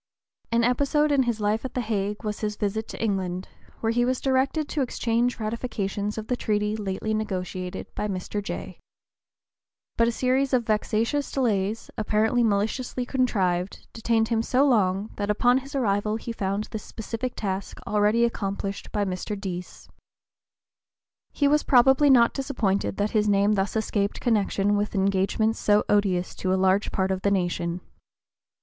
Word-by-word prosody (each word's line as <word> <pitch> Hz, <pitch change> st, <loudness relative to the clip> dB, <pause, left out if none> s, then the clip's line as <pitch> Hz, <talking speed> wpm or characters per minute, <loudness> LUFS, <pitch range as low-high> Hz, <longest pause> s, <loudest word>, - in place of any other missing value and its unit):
An 230 Hz, 0 st, +3 dB
episode 285 Hz, +5 st, +2 dB
in 280 Hz, -2 st, +4 dB
his 225 Hz, -2 st, -2 dB
life 210 Hz, +1 st, 0 dB
at 260 Hz, -, -6 dB
the 250 Hz, -, 0 dB
Hague 210 Hz, -1 st, -2 dB
was 210 Hz, -1 st, -3 dB
his 210 Hz, -1 st, -2 dB
visit 215 Hz, +2 st, -2 dB
to -, -, -8 dB
England, 190 Hz, -4 st, -2 dB, 0.3 s
where 225 Hz, -, +1 dB
he 240 Hz, +1 st, +2 dB
was 255 Hz, +1 st, 0 dB
directed 270 Hz, +3 st, +1 dB
to 295 Hz, -, -1 dB
exchange 240 Hz, -1 st, 0 dB
ratifications 215 Hz, -2 st, -3 dB
of 220 Hz, -, -4 dB
the 250 Hz, -, -1 dB
treaty 210 Hz, -2 st, 0 dB
lately 210 Hz, +1 st, -3 dB
negotiated 185 Hz, -4 st, -3 dB
by 210 Hz, -, -2 dB
Mr. 195 Hz, +1 st, -3 dB
Jay. 200 Hz, -, -6 dB, 1.2 s
But 230 Hz, -, +4 dB
a -, -, +2 dB
series 260 Hz, +3 st, +1 dB
of 245 Hz, -2 st, +2 dB
vexatious 225 Hz, +6 st, 0 dB
delays, 215 Hz, -5 st, -1 dB
apparently 220 Hz, +3 st, +2 dB
maliciously 225 Hz, +4 st, 0 dB
contrived, 195 Hz, -9 st, 0 dB
detained 225 Hz, 0 st, +1 dB
him 225 Hz, -1 st, +2 dB
so 260 Hz, +4 st, +2 dB
long 200 Hz, -4 st, +2 dB
that 205 Hz, 0 st, -2 dB
upon 245 Hz, +5 st, +3 dB
his 275 Hz, +2 st, -10 dB
arrival 210 Hz, -4 st, +1 dB
he 230 Hz, +1 st, -5 dB
found 200 Hz, -1 st, -2 dB
this 220 Hz, -, -4 dB
specific 230 Hz, +3 st, -5 dB
task 195 Hz, -2 st, -4 dB
already 210 Hz, +3 st, +3 dB
accomplished 200 Hz, -3 st, -3 dB
by 205 Hz, -1 st, 0 dB
Mr. 195 Hz, +2 st, -4 dB
Deas. 180 Hz, -2 st, -6 dB, 1.4 s
He 285 Hz, -, +2 dB
was 300 Hz, +1 st, +4 dB
probably 265 Hz, +3 st, +5 dB
not 240 Hz, -3 st, +6 dB
disappointed 220 Hz, -9 st, -1 dB
that 205 Hz, +1 st, 0 dB
his 210 Hz, -1 st, +2 dB
name 200 Hz, +1 st, +3 dB
thus 195 Hz, +1 st, -1 dB
escaped 205 Hz, -2 st, -1 dB
connection 205 Hz, -3 st, +1 dB
with 205 Hz, +1 st, -1 dB
engagements 195 Hz, +3 st, +1 dB
so 210 Hz, 0 st, +3 dB
odious 195 Hz, -4 st, +1 dB
to 185 Hz, -, -1 dB
a -, -, +3 dB
large 190 Hz, +2 st, +2 dB
part 190 Hz, 0 st, 0 dB
of 190 Hz, 0 st, -2 dB
the 200 Hz, -, +2 dB
nation. 175 Hz, -2 st, -1 dB
215 Hz, 160 wpm, -25 LUFS, 200-240 Hz, 1.4 s, not